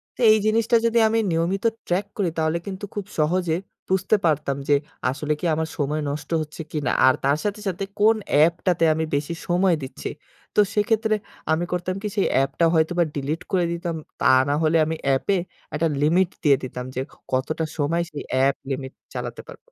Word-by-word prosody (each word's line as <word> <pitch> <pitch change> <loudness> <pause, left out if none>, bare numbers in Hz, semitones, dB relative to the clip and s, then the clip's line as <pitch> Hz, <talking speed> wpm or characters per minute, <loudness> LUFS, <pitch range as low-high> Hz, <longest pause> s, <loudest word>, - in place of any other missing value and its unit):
তো - - -29
এই 215 - +6
জিনিসটা 225 +2 +3
যদি 230 0 +2
আমি 225 +1 +2
নিয়মিত 170 +6 0 0.2
ট্রাক 185 +3 +1
করি 195 -5 +1
তাহলে 160 +1 +1
কিন্তু 195 +1 -5
খুব 205 -2 -3
সহজে 165 +2 +2 0.3
বুঝতে 190 +3 +2
পারতাম 150 -3 +1
যে, 145 - +6 0.3
আসলে 150 +3 -1
কি - - -4
আমার 160 0 -2
সময় 150 +1 -1
নষ্ট 145 +1 -5
হচ্ছে 155 +1 -7
কিনা 145 -5 -1 0.2
আর 130 - +6
তার 140 +2 +3
সাথে, 205 0 -2
সাথে 190 +1 -2 0.2
কোন 220 +2 +5 0.2
অ্যাপটাতে 170 +3 +3
আমি 160 +1 -1
বেশি 145 +4 -2
সময় 180 0 +3
দিচ্ছি। 130 - -6 0.5
তো - - +3 0.2
সেক্ষেত্রে 220 +1 +2 0.4
আমি 160 +2 +2
করতাম 180 +1 -1
কি - - 0
সেই 200 - +2
অ্যাপটা 135 +4 +2
হয়তো 160 +1 +2 0.2
ডিলিট 145 +4 -2
করে 180 -2 +2
দিতাম, 170 0 -3 0.2
তা - - -2 0.2
না - - +2
হলে 160 +1 +3
আমি 160 +1 -2
অ্যাপ 135 -1 +2
এ - - +2 0.4
একটা 160 +2 +1
লিমিট 170 +5 +3
দিয়ে 140 -4 +5
দিতাম 125 -1 -5
যে, 130 - -1 0.3
কতটা 145 +5 0
সময় 160 +3 +1
সেই 150 - -6
অ্যাপ 135 +1 +3
লিমিট 135 -1 -4 0.2
চালাতে - - -5
পারবো। - - -10
165 Hz, 185 wpm, -23 LUFS, 145-185 Hz, 0.5 s, এই